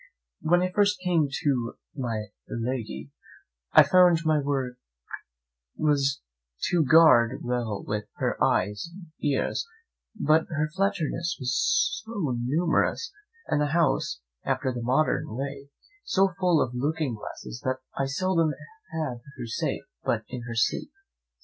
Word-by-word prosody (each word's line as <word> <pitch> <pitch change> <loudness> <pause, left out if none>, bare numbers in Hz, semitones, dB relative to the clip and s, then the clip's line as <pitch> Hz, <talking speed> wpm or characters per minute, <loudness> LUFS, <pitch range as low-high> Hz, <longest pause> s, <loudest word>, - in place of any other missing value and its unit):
When 175 +2 +3
I 185 - 0
first 205 +1 +2
came 170 -5 +3 0.2
to 125 -5 +1 0.2
my 115 -6 -3 0.2
lady, 115 - -4 0.6
I - - +9
found 180 -2 +5
my 155 -1 +4
great 145 - -2
work 130 -3 -1 1.0
was 140 -2 +2 0.5
to 175 -2 +4
guard 130 -5 +6
well 120 -4 -2 0.3
her - - -1
eyes 105 +9 +1
and 170 -2 -13
ears; 145 -2 0 0.6
but 155 -2 +3
her 155 -1 -1
flatterers 185 -3 0
were 130 - -6
so 160 - 0
numerous, 155 +2 +1 0.3
and 150 - +1
the 145 0 0
house, 150 - +1 0.2
after 130 - 0
the 120 - -4
modern 125 -2 +1
way, 140 +1 -5 0.3
so 190 -1 +2
full 180 -4 +4
of 120 - -5
looking 145 +1 -1
glasses, 110 +2 -8
that 130 0 -1
I 135 - 0
seldom 165 +1 +1 0.4
had 150 -7 -3 0.2
her - - -5
safe 115 - -2 0.2
but - - 0
in 125 -1 -5
her 115 - -5
sleep. 120 - +1
145 Hz, 135 wpm, -27 LUFS, 125-165 Hz, 1.0 s, I